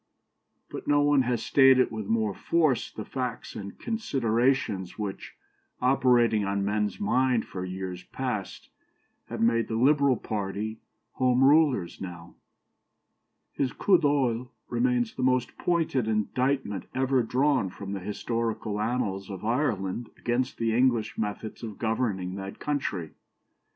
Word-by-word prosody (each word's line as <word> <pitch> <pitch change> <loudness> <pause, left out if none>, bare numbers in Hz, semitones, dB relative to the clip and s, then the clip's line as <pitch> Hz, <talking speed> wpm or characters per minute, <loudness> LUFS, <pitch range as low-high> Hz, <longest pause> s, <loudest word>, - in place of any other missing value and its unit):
But - - -7
no 145 0 +4
one 145 -1 +4
has 120 -3 0
stated 135 -2 +5
with 110 -3 -5
more 110 -2 +1
force 155 - +1
the 110 - -7
facts 125 -3 -4
and 100 -1 -7
considerations 125 - 0
which, 105 -3 -5 0.4
operating 125 -4 +3
on 100 0 -1
men's 105 0 -1
mind 130 - +2
for 90 - -6
years 95 -1 -5
past, 125 -7 -4 0.6
have - - -5
made 115 0 +3
the 110 - -3
Liberal 140 +1 +4
party 105 +1 -4 0.4
Home 130 0 +3
Rulers 140 - +3
now. 85 -2 -8 1.2
His 135 -3 -1
coup 190 -3 +4
d'oeil 130 -5 +1 0.2
remains 245 -2 +1
the - - -5
most 125 -1 +1
pointed 160 -9 +1
indictment 110 0 -1
ever 130 0 +2
drawn 130 -2 +1
from 100 +2 -7
the 100 - -3
historical 105 +1 -2
annals 105 -4 -2
of 95 0 -6
Ireland 115 -4 -1
against 125 +2 -1
the 115 -1 0
English 120 -4 +2
methods 105 0 -4
of 110 -4 -7
governing 110 -5 -1
that 95 0 -7
country. 100 - -2
115 Hz, 130 wpm, -27 LUFS, 105-130 Hz, 1.2 s, stated